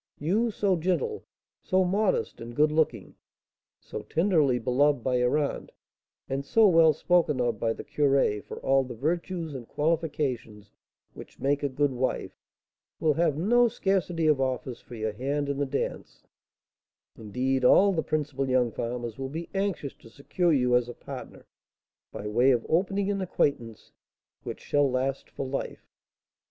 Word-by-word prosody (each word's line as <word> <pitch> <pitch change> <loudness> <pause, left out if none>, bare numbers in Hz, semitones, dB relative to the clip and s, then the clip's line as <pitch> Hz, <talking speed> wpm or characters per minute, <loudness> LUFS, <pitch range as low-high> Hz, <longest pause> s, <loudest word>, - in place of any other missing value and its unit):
You, 205 +10 +1
so 200 -3 +1
gentle, 185 - -1 0.4
so 185 0 +2
modest 195 - 0
and 115 +1 -8
good 150 +2 +3
looking, 155 0 0 0.7
so - - -7
tenderly 160 -7 +2
beloved 125 +2 +2
by 130 -1 +1
your 125 +4 +2
aunt, 145 -2 -3 0.6
and 135 +1 -2
so 220 +9 +4
well 165 -3 +6
spoken 155 -2 +1
of 120 -3 0
by 115 0 0
the - - -8
curé 140 -7 +1
for - - -9
all 135 0 +3
the 125 -2 -8
virtues 165 - -2
and 125 -4 -8
qualifications 145 -10 -2 0.4
which - - -12
make 145 +1 +1
a 145 - 0
good 145 +1 +1
wife, 130 0 -2 0.7
will 155 -2 +2
have 160 -2 +1
no 240 +8 +4
scarcity 185 -6 0
of 150 -3 +3
offers 130 -1 -3
for 120 - -11
your 110 -1 -3
hand 140 +6 -2
in 140 0 -2
the 140 - 0
dance, 140 +1 -4 0.9
indeed, 130 +5 -2
all 195 +10 +6
the 160 - 0
principal 145 -4 -2
young 125 -2 +2
farmers 120 +1 -4
will 135 0 -4
be 165 +4 -6
anxious 195 -8 -2
to 115 - -16
secure 165 +7 -1
you 125 -4 +3
as 125 0 +1
a 120 - -8
partner, - - -9 0.7
by 100 - -7
way 120 +5 +3
of 120 -3 +2
opening 195 +4 +1
an 200 -1 -2
acquaintance 135 - -2 0.5
which - - -7
shall 145 -1 +2
last 130 +1 -2
for 135 - -5
life. 135 +1 -5
145 Hz, 160 wpm, -27 LUFS, 125-170 Hz, 0.9 s, well